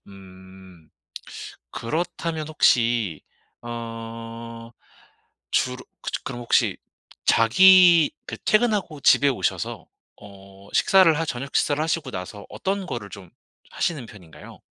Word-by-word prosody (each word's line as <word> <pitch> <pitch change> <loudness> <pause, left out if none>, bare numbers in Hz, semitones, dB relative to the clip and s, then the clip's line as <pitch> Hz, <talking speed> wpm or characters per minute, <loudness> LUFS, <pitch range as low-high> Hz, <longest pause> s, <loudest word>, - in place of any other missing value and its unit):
음 95 -3 -15 0.8
그렇다면 160 +3 -3
혹시 115 - +2 0.4
어 115 0 -8 0.8
주로 125 0 -1 0.2
그저 - - -4
그럼 130 -2 -6
혹시 120 - +2 0.5
자기 175 - +6
그 - - -6
퇴근하고 210 -9 +1
집에 140 +1 +5
오셔서 135 - -2 0.4
어 100 -1 -15
식사를 185 -5 +5
하 165 - 0
저녁 140 0 -4
식사를 145 +1 +1
하시고 160 -3 -2
나서 95 +3 -7
어떤 195 0 -3
거를 120 - -6
좀 95 -4 -12 0.4
하시는 155 -7 -2
편인가요? 90 -8 -14
120 Hz, 225 characters per minute, -23 LUFS, 100-160 Hz, 0.8 s, 자기